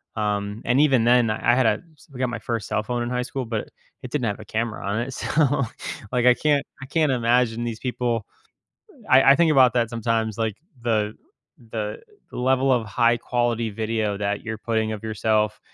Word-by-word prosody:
um, 105 0 -2
and 125 +3 +3
even 135 -6 +4
then, 120 -1 +4
I 120 +2 +2
had 130 -1 +3
a 105 -1 +2 0.2
s - - -20
I - - -9
got 130 -1 0
my 120 - -4
first 115 -3 -3
cell 110 0 -1
phone 120 +2 -2
in 120 - -2
high 125 0 -1
school, 130 +1 -4
but 110 -2 -4 0.3
it 125 - -7
didn't 140 -4 -1
have 105 0 -3
a 110 - -10
camera 110 0 -3
on 100 +3 -1
it. 130 +3 -4
So, 145 0 +1 0.5
like, 125 -1 +1
I 125 - +8
can't 145 -1 +1 0.2
I - - -6
can't 155 +1 +1
imagine 120 -1 +1
these 115 -2 -4
people. 120 -3 -2 0.6
Uh, - - -19
I 135 +1 +7
I - - +6
think 165 0 +4
about 130 -4 +5
that 120 -2 +1
sometimes, 115 -2 -1
like, 110 -3 -1 0.3
the 110 -3 0 0.6
the 105 -2 -4 0.3
level 130 +1 +1
of 120 -3 +2
high 120 +3 +2
quality 120 -1 -1
video 110 -1 -1
that 100 0 -2
you're 110 0 -4
putting 110 -1 -1
of 110 -2 -5
yourself, 110 0 0
115 Hz, 205 wpm, -23 LUFS, 110-125 Hz, 0.6 s, I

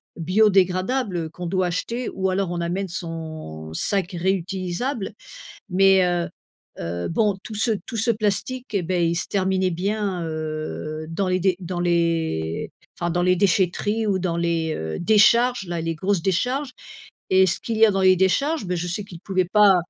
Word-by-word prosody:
biodégradables 185 +1 +2
qu'on 175 0 -6
doit 185 0 +1
acheter 235 +8 -3
ou 190 0 -1
alors 185 -1 0
on 175 -1 -2
amène 185 +3 -2
son 160 - -6
sac 195 - -1
réutilisable, 190 +6 -2 0.6
mais 190 0 +5
heu 175 -1 0 0.5
heu, 85 +1 -3
bon 205 +2 +1
tout 220 - -8
ce 225 +3 +1 0.2
tout 230 - -5
ce 225 +2 +1
plastique, 225 +3 -1
et 195 - +1
beh, 175 -1 +1
il 170 - 0
se - - -1
terminait 190 -1 +1
bien, 195 +1 -2
heu, 155 0 -4
dans 185 +4 -1
les 185 0 +1
d 185 0 +2
dans 175 -1 -4
les 165 - 0 0.3
enfin, 175 - 0
dans 175 +1 0
les 180 0 +4
déchèteries 200 +3 +1
ou 195 -2 +1
dans 175 -2 -1
les, 165 -2 0
heu, 80 0 -4
décharges 220 +3 +4
là, 170 -1 -3
les 165 0 -2
grosses 190 +3 0
décharges 250 - 0 0.6
et 190 0 +6
ce 175 - +1
qu'il 225 -2 -3
y 225 - +8
a - - +3
dans 195 -1 0
les 185 0 +6
décharges, 235 - +1
bah, 180 - -1
je 175 +1 -3
sais 175 +4 -3
qu'ils 180 -4 -11
pouvaient 185 -2 0
pas 205 0 +6
185 Hz, 180 wpm, -23 LUFS, 170-205 Hz, 0.6 s, y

